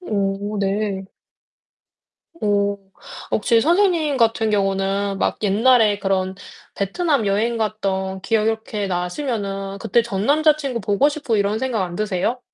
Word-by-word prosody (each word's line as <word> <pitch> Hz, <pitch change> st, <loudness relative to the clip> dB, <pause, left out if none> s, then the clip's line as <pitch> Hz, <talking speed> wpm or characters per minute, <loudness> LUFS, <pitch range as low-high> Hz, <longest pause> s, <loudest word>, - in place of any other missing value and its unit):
오 205 Hz, -, -2 dB
네. 200 Hz, 0 st, -1 dB, 1.3 s
오 205 Hz, -6 st, 0 dB, 0.5 s
혹시 230 Hz, +1 st, +3 dB
선생님 335 Hz, -, +2 dB
같은 225 Hz, -2 st, +2 dB
경우는 195 Hz, 0 st, 0 dB
막 -, -, 0 dB
옛날에 215 Hz, +1 st, +4 dB
그런 190 Hz, -1 st, -1 dB, 0.4 s
베트남 260 Hz, -, 0 dB
여행 220 Hz, +4 st, 0 dB
갔던 190 Hz, -3 st, -2 dB
기억 215 Hz, +1 st, +1 dB
이렇게 220 Hz, -2 st, -2 dB
나시면은 195 Hz, +1 st, -3 dB
그때 235 Hz, +5 st, +2 dB
전 205 Hz, -3 st, -3 dB
남자친구 295 Hz, -4 st, +2 dB
보고 205 Hz, +8 st, +2 dB
싶고 290 Hz, -6 st, -2 dB
이런 205 Hz, +1 st, +1 dB
생각 240 Hz, -4 st, -1 dB
안 175 Hz, -1 st, -5 dB
드세요? 215 Hz, +4 st, -1 dB
210 Hz, 260 characters per minute, -21 LUFS, 195-235 Hz, 1.3 s, 옛날에